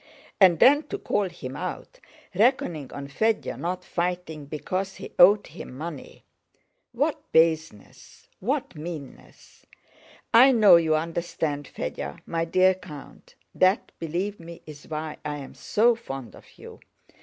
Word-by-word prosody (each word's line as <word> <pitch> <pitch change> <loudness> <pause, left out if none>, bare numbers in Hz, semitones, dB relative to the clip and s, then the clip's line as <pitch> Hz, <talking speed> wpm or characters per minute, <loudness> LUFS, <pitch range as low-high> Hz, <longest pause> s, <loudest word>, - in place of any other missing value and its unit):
And 185 -4 +6
then 285 - +6
to 405 - -4
call 205 - -1
him 135 -7 -8
out, - - -6 0.3
reckoning 175 - +1
on 140 0 -7
Fédya 220 +10 0
not 180 +2 -4
fighting 170 -4 -3
because 185 +6 -4
he - - -10
owed 200 +4 +7
him 150 -5 -10
money! 155 -2 -8 0.7
What - - -1
baseness! 160 -9 0
What 260 - -2
meanness! 155 -3 -10 0.7
I 255 +4 +8
know 215 -7 +7
you 160 -2 +2
understand 160 -3 -3
Fédya, 70 0 -5
my 165 0 -2
dear 185 +2 +4
count; 165 -6 -13 0.2
that, 185 +3 +2
believe 180 +6 -3
me, 170 0 -11
is 150 -2 -12
why 155 0 -5
I 150 -1 -4
am 140 -2 -9
so 235 +3 +2
fond 135 - -8
of - - -18
you. - - -12
170 Hz, 135 wpm, -25 LUFS, 150-195 Hz, 0.7 s, I